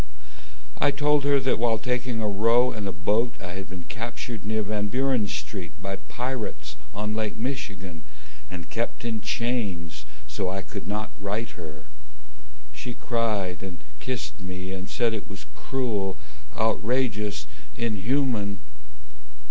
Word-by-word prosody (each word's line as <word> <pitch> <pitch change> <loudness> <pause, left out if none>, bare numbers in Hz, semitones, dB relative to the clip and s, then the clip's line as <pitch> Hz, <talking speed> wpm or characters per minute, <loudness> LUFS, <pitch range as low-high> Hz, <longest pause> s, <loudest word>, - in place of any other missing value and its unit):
I - - +6
told 145 0 +4
her 140 -1 +6
that 130 -4 +3
while 115 -1 +4
taking 125 +1 0
a 105 - +2
row 115 +5 +5
in 105 -4 -2
a - - 0
boat 105 +8 +2
I 90 -2 -5
had 95 +1 -5
been 95 -1 -6
captured 115 +1 -4
near 110 +1 +1
Van 105 0 0
Buren 125 -1 +3
Street 90 +1 -3
By 95 +1 -2
pirates 125 0 -3 0.2
on 105 +1 -1
Lake 110 -1 0
Michigan, 100 - -3 0.5
And 85 -3 -6
kept 115 +4 -1
in 110 -2 0
chains, 100 -10 0 0.2
so 95 - -1
I 95 +1 -1
could 100 0 -5
not 105 +1 -1
write 105 +3 -1
her. 80 -5 -8 0.9
She 120 -1 -5
cried 105 -6 +1
and 95 -3 -5 0.2
kissed 125 +1 -2
me, 95 0 -4
and 95 0 -4
said 115 -2 +3
it 110 - -3
was 100 -7 -7
cruel, 110 -8 0 0.4
Outrageous, 110 -4 +2 0.3
inhuman! 115 -1 +2
105 Hz, 140 wpm, -28 LUFS, 95-120 Hz, 0.9 s, I